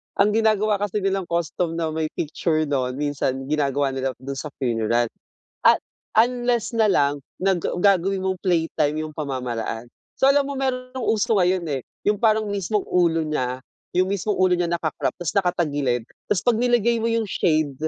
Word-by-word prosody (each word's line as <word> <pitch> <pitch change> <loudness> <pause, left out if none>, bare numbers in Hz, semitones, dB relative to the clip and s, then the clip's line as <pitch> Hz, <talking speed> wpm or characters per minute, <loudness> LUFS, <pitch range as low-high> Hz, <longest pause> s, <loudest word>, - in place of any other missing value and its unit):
ang 200 +1 +4
ginagawa 215 -1 +2
kasi 205 0 -2
nilang 195 -1 0
custom 170 0 -1
na 165 -1 -1
may 160 0 -2
picture 155 0 -1
'non 130 -3 0
minsan 135 -2 -2
ginagawa 145 -2 +1
nila 135 0 -2
dun 135 +1 -5
sa 145 +1 -6
funeral. 115 -1 +1 0.5
At - - +6 0.4
unless 240 -1 +1
nalang 145 -11 +2 0.2
nag 190 -2 +1 0.2
gagawin 195 0 +3
mong 190 0 -2
playtime 160 -4 +1
yung 155 -1 -5
pamamaraan. 125 -5 -3 0.3
So 265 - +5
alam 280 0 +5
mo 270 - -4
meron 255 -1 -2
ng 245 - -3
uso 225 +2 +1
ngayon 180 0 +2 0.2
eh, - - -10 0.2
yung 210 -1 +1
parang 220 -1 +3
mismong 205 0 -1
ulo 165 -2 +2
niya, 130 -4 -2 0.3
yung 185 +2 +2
mismong 200 +1 -1
ulo 185 0 +3
niya 175 -1 +1
naka-crop 170 -2 -2
tas 175 -3 -3
naka-tagilid 150 - 0 0.2
'tas 185 - 0
pag 235 -2 +2
nilagay 235 -1 +2
mo 225 - 0
yung 230 -1 +1
shade, 155 -7 +1
175 Hz, 170 wpm, -23 LUFS, 145-210 Hz, 0.5 s, At